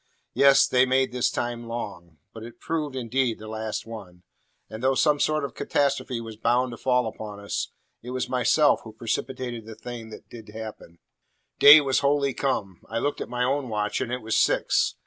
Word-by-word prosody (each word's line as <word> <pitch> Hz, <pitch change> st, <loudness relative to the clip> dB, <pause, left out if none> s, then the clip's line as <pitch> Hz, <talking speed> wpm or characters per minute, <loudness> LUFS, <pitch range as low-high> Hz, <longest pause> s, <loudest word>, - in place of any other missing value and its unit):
Yes, 140 Hz, 0 st, +6 dB
they 130 Hz, 0 st, +3 dB
made 130 Hz, 0 st, +2 dB
this 125 Hz, -1 st, +1 dB
time 120 Hz, -1 st, -4 dB
long. 100 Hz, -8 st, -7 dB, 0.2 s
But 110 Hz, -, -9 dB
it 115 Hz, +1 st, -11 dB
proved, 155 Hz, -4 st, -3 dB
indeed, 125 Hz, -1 st, -1 dB
the 110 Hz, -, -10 dB
last 110 Hz, 0 st, -4 dB
one. 95 Hz, -6 st, -10 dB, 0.4 s
And 110 Hz, +1 st, -8 dB
though 130 Hz, +1 st, +2 dB
some 150 Hz, +1 st, +3 dB
sort 155 Hz, -1 st, +1 dB
of 135 Hz, -, -7 dB
catastrophe 140 Hz, -3 st, -1 dB
was 115 Hz, -2 st, -8 dB
bound 120 Hz, +3 st, +1 dB
to 120 Hz, -, -8 dB
fall 125 Hz, -1 st, +1 dB
upon 105 Hz, -2 st, -7 dB
us, 100 Hz, 0 st, -3 dB, 0.3 s
it 125 Hz, -, -9 dB
was 130 Hz, 0 st, -2 dB
myself 140 Hz, +4 st, +3 dB
who 110 Hz, -, -11 dB
precipitated 120 Hz, +1 st, -4 dB
the 110 Hz, -, -9 dB
thing 120 Hz, -2 st, -8 dB
that 110 Hz, -, -12 dB
did 115 Hz, -3 st, -12 dB
happen. 110 Hz, -6 st, -9 dB, 0.6 s
Day 150 Hz, +2 st, +10 dB
was 135 Hz, -2 st, +1 dB
wholly 140 Hz, -1 st, +1 dB
come. 100 Hz, -11 st, -2 dB
I 115 Hz, -, -3 dB
looked 145 Hz, +5 st, -1 dB
at -, -, -5 dB
my 125 Hz, 0 st, -1 dB
own 135 Hz, 0 st, 0 dB
watch, 105 Hz, -1 st, -1 dB
and 120 Hz, -, -3 dB
it 125 Hz, -2 st, -3 dB
was 110 Hz, 0 st, -1 dB
six. -, -, +2 dB
120 Hz, 195 wpm, -25 LUFS, 110-130 Hz, 0.6 s, Day